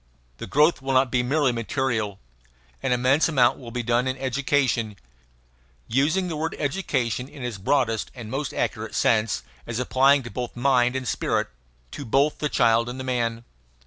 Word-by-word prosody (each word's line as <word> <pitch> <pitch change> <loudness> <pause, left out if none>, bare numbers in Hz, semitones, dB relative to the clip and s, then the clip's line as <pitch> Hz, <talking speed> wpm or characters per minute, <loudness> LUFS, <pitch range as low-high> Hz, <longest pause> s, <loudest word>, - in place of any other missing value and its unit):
The - - -7
growth 150 +2 +3
will 135 0 -2
not 130 -1 +3
be 125 - +2
merely 135 +2 +2
material. 115 -3 -2 0.6
An - - -1
immense 130 +6 +3
amount 125 -6 +3
will 125 -3 -9
be 120 +1 -3
done 120 +2 +1
in 130 +1 -2
education; 130 -4 0 0.9
using 155 +10 +1
the 165 - -3
word 160 +2 -3
education 135 - -1
in 145 -3 -10
its 120 -5 -4
broadest 115 0 0
and 115 -3 -8
most 140 +1 -2
accurate - - -3
sense, 110 -1 +1 0.2
as 115 - -3
applying 130 +3 +3
to 120 - -8
both 125 -2 -5
mind 125 0 +2
and 130 -2 -3
spirit, - - 0 0.4
to 145 - -6
both 140 +5 +1
the 150 - -1
child 115 -2 +3
and 125 +2 -6
the - - -4
man. 120 -3 -1
130 Hz, 175 wpm, -24 LUFS, 120-140 Hz, 0.9 s, growth